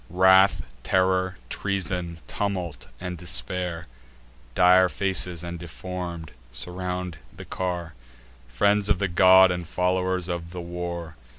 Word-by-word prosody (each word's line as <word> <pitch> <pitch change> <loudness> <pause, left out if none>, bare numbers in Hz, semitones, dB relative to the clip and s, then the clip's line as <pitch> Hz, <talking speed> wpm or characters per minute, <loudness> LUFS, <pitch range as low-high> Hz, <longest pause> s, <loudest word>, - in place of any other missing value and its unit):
Wrath, 95 +2 +5 0.2
Terror, 95 +3 +1
Treason, 90 -2 -3
Tumult, 90 -6 -3
and 90 -1 -5
Despair 90 +2 -2 0.7
(Dire 90 0 +6
faces, 90 -3 -1
and 85 0 -6
deform'd) 85 -1 -6 0.2
surround 90 +6 -4
the 95 -1 -11
car; 90 -2 -4 0.5
Friends 100 +12 +2
of - - +3
the 100 - 0
god, 95 +1 +6
and 90 -2 -4
followers 90 0 0
of 85 -1 -4
the 90 - -5
war. 85 -2 -6
90 Hz, 115 wpm, -25 LUFS, 85-95 Hz, 0.7 s, Dire